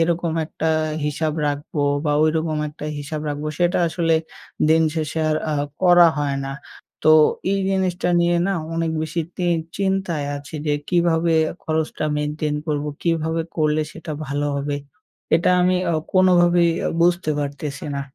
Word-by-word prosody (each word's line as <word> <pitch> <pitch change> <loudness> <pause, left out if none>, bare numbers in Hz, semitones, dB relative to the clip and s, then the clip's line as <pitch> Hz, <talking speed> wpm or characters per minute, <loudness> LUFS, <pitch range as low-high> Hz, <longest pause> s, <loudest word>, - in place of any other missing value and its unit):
এরকম 170 0 +1
একটা 160 - -4 0.4
হিসাব 150 +1 -1
রাখবো 145 +1 -3 0.2
বা, 150 - +1
ওইরকম 155 0 0
একটা 150 0 -10
হিসাব 145 +1 -5
রাখবো, 145 +1 -3
সেটা 175 0 +2
আসলে 165 -1 +1 0.5
দিন 160 +1 +5
শেষে 155 0 -2
আর 155 - +2 0.2
আ - - 0 0.3
করা 175 -1 +7
হয় 140 -2 -1
না। 135 - -4 0.5
তো 155 - +8 0.4
এই 200 - +1
জিনিসটা 185 -2 0
নিয়ে 175 0 +2
না 195 - +1 0.2
অনেক 165 0 0
বেশি 160 +2 -2 0.2
তি 180 - -2 0.3
চিন্তায় 190 -6 -1
আছি 140 +1 -10
যে, 150 - +2 0.2
কীভাবে 170 -2 +2 0.3
খরচটা 160 -1 -1
maintain 150 0 -2
করবো, 150 -1 -1
কীভাবে 165 -1 0 0.2
করলে 155 -1 +2
সেটা 165 -1 -9 0.2
ভালো 145 +2 -2
হবে? 145 +1 -2 0.6
এটা 170 - +1
আমি 180 +1 +3 0.2
অ - - +1 0.2
কোনোভাবেই 175 -2 +4 0.2
অ - - +1
বুঝতে 175 -1 +2
পারতেছি 145 0 -4
না। 140 - -2
160 Hz, 150 wpm, -21 LUFS, 150-175 Hz, 0.6 s, তো